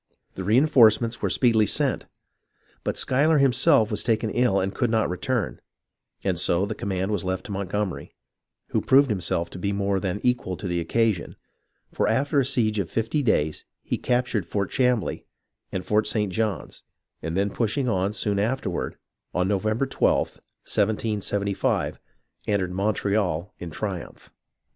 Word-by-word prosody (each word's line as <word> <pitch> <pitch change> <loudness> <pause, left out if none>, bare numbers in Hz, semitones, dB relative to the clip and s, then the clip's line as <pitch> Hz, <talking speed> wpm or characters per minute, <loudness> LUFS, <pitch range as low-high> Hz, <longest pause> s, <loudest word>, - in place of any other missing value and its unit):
The - - -6
reen 115 +10 +3
forcements 115 -4 +4
were - - 0
speedily 115 -4 +3
sent, - - +1 0.8
but - - -2
Schuyler 150 +5 +3
himself 125 -5 +4
was 105 - 0
taken 110 -2 0
ill 120 -5 +2
and 95 +1 -1
could 120 - 0
not 110 -4 +1
return, 115 +6 -2 0.6
and - - 0
so 85 +3 +2
the 105 - -3
command 95 -1 -2
was 105 -5 -1
left 95 +3 -3
to 110 - -7
Montgomery, 100 0 -3 0.5
who - - 0
proved 135 -1 +4
himself 85 -3 -1
to - - -8
be 100 +2 -1
more 100 -1 0
than 95 +1 -2
equal 120 -8 0
to 100 - -5
the 85 -1 -1
occasion; 110 +2 0 0.6
for - - 0
after 140 +2 +2
a 135 - +2
siege 110 -5 +1
of 95 - -2
fifty 115 +7 -1
days 80 - +1 0.2
he - - -2
captured 120 -4 0
Fort 100 0 -2
Chambly 125 -4 0 0.4
and 95 -1 -4
Fort 105 0 +2
St. 105 -3 0
John's, 110 -3 -2 0.4
and 80 +2 -3
then 100 +1 +1
push 115 +3 -1
ing 135 -2 0
on, 95 -3 +1
soon 100 -1 0
afterward, 105 -4 -2 0.4
on 90 +1 +1
November 110 +5 0
12th, 135 - +1 0.3
1775, 105 -2 0 0.5
entered 95 -3 0
Montreal 100 -3 0
in 85 - -6
triumph. 95 +1 -6
105 Hz, 160 wpm, -25 LUFS, 95-115 Hz, 0.8 s, forcements